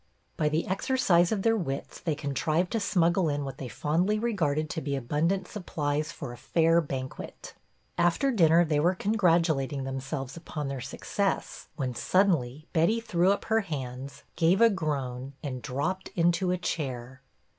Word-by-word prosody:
By 150 - +1
the 155 +2 0
exercise 190 -4 +2
of 205 -3 0
their 225 0 +4
wits 140 -9 -4
they 160 -3 -1
con 145 -1 -4
trived 160 +5 0
to 225 - 0
smuggle 175 -3 +2
in 145 -1 -1
what 135 0 -7
they 130 - -5
fondly 175 - 0
re 235 +2 -1
garded 155 -5 0
to 160 - -3
be 140 -1 -2
abundant 160 +9 0
supplies 155 -6 -2
for 135 -6 -7
a - - -10
fair 165 +4 +3
banquet. 135 -4 -6 0.5
After 175 +11 +3
dinner 170 -6 +5
they 155 -2 +1
w'ere 175 +5 +3
congrat 185 -4 +3
ulating 140 -4 -1
themselves 135 0 -4
upon 155 -4 -5
their 135 -2 -4
success, 200 +9 -2
when 130 -4 -2
suddenly 155 -3 +1
Betty 175 +7 +3
threw 185 -5 +2
up 200 - -1
her 225 0 +3
hands, 135 -6 -6
gave 170 +3 +3
a 230 0 +6
groan, 135 -7 -3
and 130 -4 -4
dropped 155 +11 -2
into 175 +2 +2
a 180 - +1
chair. 130 -6 -4
160 Hz, 170 wpm, -28 LUFS, 140-185 Hz, 0.5 s, a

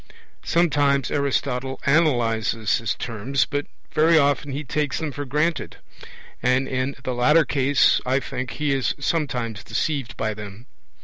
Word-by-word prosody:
Sometimes 145 -5 +2
Aristotle 135 -2 -1
analyses 115 -8 +2
his 115 -4 -2
terms, 120 +4 -1
but 145 -1 -3 0.2
very 160 +1 +4
often 145 -1 +2
he 140 +3 -4
takes 145 -2 -1
them 155 -2 -3
for 145 +1 -5
granted; 150 +5 -1 0.6
and 125 +2 +2
in 130 +1 -2
the 130 - -2
latter 150 +7 +4
case, 140 -1 +3
I 130 +2 +1
think, 125 -2 -5
he 150 -2 0
is 135 -2 0
sometimes 125 -8 -2
deceived 135 -7 -2
by 110 -1 -1
them. 105 +2 -10
135 Hz, 140 wpm, -23 LUFS, 120-145 Hz, 0.6 s, very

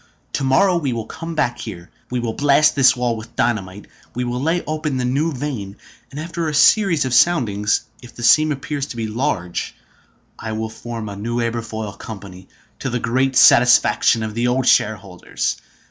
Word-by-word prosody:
To 140 - -2
morrow 175 +8 +3
we 140 -7 -1
will 115 -2 -4
come 165 0 -7
back 120 -5 0
here. 85 +1 -8 0.2
We 125 - -2
will 115 -2 -3
blast 145 +3 +3
this 135 -1 +5
wall 120 -2 -1
with 115 +1 -10
dynamite. 105 -4 -2 0.3
We 125 - -2
will 125 +1 -3
lay 165 +4 0
open 155 -2 -2
the 125 - -1
new 140 +6 0
vein, 125 -8 -5 0.3
and 140 - -8
after 170 0 -3
a 150 - -3
series 170 -2 +4
of 130 - -2
soundings, 115 -9 +2 0.2
if 120 -2 -14
the 120 - -8
seam 155 +6 +5
appears 140 0 -4
to 125 - -8
be 115 - -2
large, 105 -6 -3 0.6
I 110 -1 -5
will 110 0 -4
form 115 -1 -7
a 100 - -6
new 115 +4 -3
Aberfoyle 115 -3 -3
Company, 95 -4 -10 0.3
to 135 - -3
the 125 - -1
great 130 +3 0
satisfaction 120 -2 +5
of 110 -1 -4
the 120 +2 0
old 125 +1 0
shareholders. 100 -6 0
120 Hz, 185 wpm, -20 LUFS, 110-140 Hz, 0.6 s, this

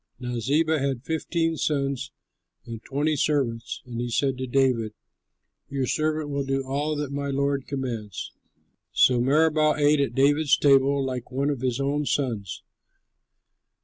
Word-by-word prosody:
Now 125 -1 -3
Ziba 155 +6 +1
had 135 -3 -2
fifteen 165 +1 -1
sons 140 -3 -1 0.5
and 115 -1 -8
twenty 150 +3 0
servants; 130 -6 -1
and 120 -1 -5
he 120 - -3
said 135 +3 +1
to 130 - -3
David, 120 -4 +1 0.8
"Your 135 -1 -1
servant 155 +1 -1
will 140 0 -1
do 135 0 -1
all 145 +3 -1
that 145 -2 -3
my 140 0 -3
lord 140 0 -1
commands." 115 -8 -4 0.6
So 125 -2 +4
Meribaal 155 +3 +3
ate 150 0 +4
at 140 - 0
David's 145 +2 +4
table 140 -1 +4
like 125 -2 -4
one 140 +3 0
of 135 -4 -4
his 130 -1 -1
own 140 +1 0
sons. 115 -9 -2
140 Hz, 145 wpm, -25 LUFS, 125-145 Hz, 0.8 s, So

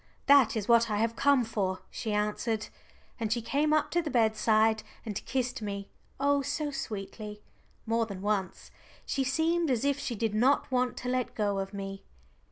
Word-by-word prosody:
"That 280 -5 +6
is 205 - -3
what 235 -1 +5
I 210 - 0
have 225 +2 0
come 280 -1 +4
for," 195 -4 -2
she 220 - -4
answered. 210 +1 -1 0.5
And 220 -2 -2
she 235 - +2
came 285 +7 0
up 310 -1 +2
to 345 - +2
the 315 - -4
bedside 220 -2 +3 0.2
and 210 -3 -4
kissed 255 -1 -1
me, 200 -1 -5 0.3
oh 285 0 +3
so 295 +2 -2
sweetly 210 -3 -6 0.4
more 230 0 +1
than 195 -2 -7
once. 205 -3 -2 0.3
She 270 - 0
seemed 320 +5 +1
as 250 0 +1
if 280 0 +1
she 245 - -3
did 220 0 -1
not 260 +6 +2
want 250 -1 +1
to 250 - -5
let 255 -1 -1
go 205 -2 0
of 195 0 -4
me. 195 -1 -6
230 Hz, 180 wpm, -29 LUFS, 210-270 Hz, 0.5 s, That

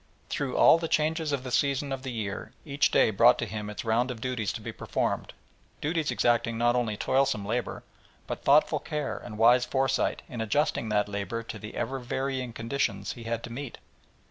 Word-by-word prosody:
Through 140 -3 -2
all 165 - +7
the 165 - -2
changes 155 0 +1
of 140 -2 -1
the 130 - -6
seasons 140 +1 +1
of 135 - -4
the 130 -1 -5
year 105 -4 -5
each 145 -1 +2
day - - +4
brought 120 +4 +6
to 115 - -2
him 105 0 -5
its 105 - -6
round 115 +3 +2
of 125 -3 -5
duties 120 -4 -2
to - - -5
be - - -5
performed, - - -2 0.5
duties 160 0 -1
exacting 115 -1 +1
not 120 +1 +3
only 115 -4 0
toilsome 130 -6 +1
labour, 120 +4 -3 0.4
but - - -5
thoughtful - - +4
care 150 -1 -3
and 105 - -9
wise 120 +3 +6
foresight 135 +1 0
in 120 -3 -5
adjusting 115 +1 0
that 105 -1 +2
labour 100 +3 -3
to - - -7
the 105 0 -9
ever 130 +3 -2
varying 130 0 -3
conditions 115 -4 -2
he 120 -2 -11
had 115 0 -2
to 120 - -7
meet. 135 0 -6
120 Hz, 195 wpm, -28 LUFS, 110-135 Hz, 0.5 s, all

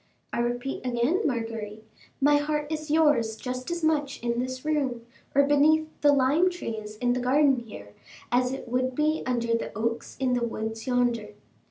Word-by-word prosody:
"I - - -1
repeat 245 +3 -2
again, 250 - +1
Marguerite, 225 -5 -3 0.4
my 290 +1 +5
heart 295 0 -2
is 310 0 -4
yours 295 -8 +3
just 255 +3 -5
as 345 -1 -3
much 295 -3 +1
in 235 0 0
this 255 +1 -4
room, 270 -6 -1 0.3
or 280 - +6
beneath 300 +2 +4
the 290 - +6
lime 285 +6 +3
trees 220 -11 -6
in 245 +2 +1
the 250 - -1
garden 270 +2 +3
here, 105 - -11 0.4
as 250 +1 +2
it 270 -1 -6
would 255 +1 -1
be 305 +2 +1
under 235 -2 0
the 230 - -1
oaks 230 +1 -3
in 260 -2 +1
the 245 -1 +1
woods 220 0 -4
yonder." 240 -4 0
255 Hz, 175 wpm, -27 LUFS, 235-295 Hz, 0.4 s, or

